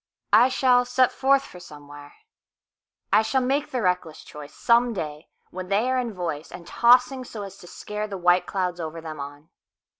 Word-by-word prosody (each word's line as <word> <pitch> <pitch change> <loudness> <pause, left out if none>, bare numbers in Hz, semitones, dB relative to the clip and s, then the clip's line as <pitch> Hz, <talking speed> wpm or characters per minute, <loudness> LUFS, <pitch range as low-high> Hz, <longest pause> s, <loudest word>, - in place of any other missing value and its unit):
I 235 +4 +7
shall 250 -1 +3
set 250 0 +2
forth 275 0 +2
for 180 - -12
somewhere,I 145 - -6
shall 260 +4 0
make 275 +3 0
the 250 -3 -3
reckless 180 -4 -2
choiceSome 235 - 0
day 150 -3 -6 0.2
when 185 0 -7
they 210 +6 +1
are 260 - +1
in 235 -4 -4
voiceAnd 170 -1 -5
tossing 250 +6 +3
so 220 -4 -8
as 195 0 -10
to 175 - -13
scareThe 210 +1 -6
white 175 +1 +3
clouds 180 -2 -2
over 165 0 -5
them 160 -2 -8
on. 145 +2 -9
195 Hz, 160 wpm, -24 LUFS, 165-250 Hz, 0.2 s, I